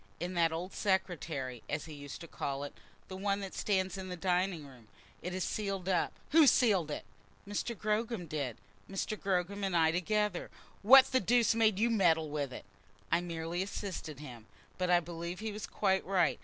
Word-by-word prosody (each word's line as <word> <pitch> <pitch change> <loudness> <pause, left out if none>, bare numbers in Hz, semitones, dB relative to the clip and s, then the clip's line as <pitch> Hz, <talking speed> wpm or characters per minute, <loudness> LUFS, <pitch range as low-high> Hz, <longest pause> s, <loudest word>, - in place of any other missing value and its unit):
"In 175 +3 -3
that 170 -2 +3
old 175 +4 -4
secretary, 160 - -1
as 150 +1 -2
he 160 - -9
used 145 +1 -8
to 170 - -8
call 140 -2 -3
it; 145 - -6 0.3
the 190 - -7
one 200 +1 0
that 195 -1 -6
stands 190 -2 0
in 185 0 -6
the 180 - -4
dining 180 -2 0
room. 125 -5 -15 0.3
It 180 - -4
is 185 - -1
sealed 195 -3 -2
up." 185 -3 +2 0.2
"Who 315 -1 +7
sealed 200 - +4
it?" 150 - -4 0.4
"Mr. 205 +3 -3
Gogram 215 -1 -1
did, 140 -6 -3 0.3
Mr. 195 +2 -2
Gogram 195 0 -1
and 190 -3 +1
I 160 -1 +4
together." 205 +2 0 0.3
"What 265 +5 +8
the 260 - +4
deuce 235 +3 +3
made 220 -3 +3
you 230 +3 +2
meddle 165 -8 +3
with 145 -3 -2
it?" - - -8 0.5
"I 170 - +3
merely 170 0 -3
assisted 190 -6 -5
him. 120 -7 -10 0.3
But 180 -1 0
I 175 -1 +5
believe 170 +1 -6
he 220 0 -3
was 210 0 -6
quite 190 0 +1
right. 185 -3 +2
180 Hz, 190 wpm, -32 LUFS, 160-200 Hz, 0.5 s, What